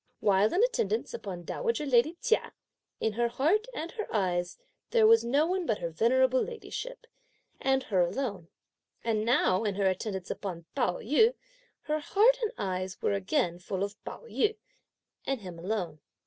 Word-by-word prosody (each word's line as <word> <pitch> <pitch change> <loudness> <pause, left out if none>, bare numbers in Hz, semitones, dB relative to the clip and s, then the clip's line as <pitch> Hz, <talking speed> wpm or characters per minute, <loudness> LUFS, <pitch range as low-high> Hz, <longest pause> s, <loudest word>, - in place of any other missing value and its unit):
While 205 +1 +3
in 390 - +3
attendance 470 -2 0
upon 185 - -6
dowager 465 - -2
lady 275 +5 +3
Chia, 465 -2 +1 0.5
in 220 - 0
her 235 +2 +1
heart 320 - +1
and 340 -9 -5
her 430 - -5
eyes 180 -4 0 0.3
there 455 -2 +4
was 455 +1 +7
no 280 +6 +2
one 365 0 -1
but 215 - +1
her 170 - -4
venerable 255 +8 +3
ladyship, - - -6 0.5
and 265 0 +2
her 190 -7 +1
alone; 190 -2 -2 0.6
and 220 -2 0
now 220 -4 +3
in 205 -3 -1
her 200 0 0
attendance 190 0 -1
upon 175 -4 -5
Pao 245 -10 +1
yü, 440 - +3 0.5
her 305 0 -1
heart 445 +10 +4
and 445 - +1
her - - -3
eyes 185 -1 -3
were - - +2
again 195 - 0
full 190 +1 -3
of 200 +1 -6
Pao - - -8
yü, 435 -2 0 0.7
and 270 -4 -1
him 180 -3 -8
alone. 180 -4 -3
235 Hz, 170 wpm, -29 LUFS, -, 0.7 s, was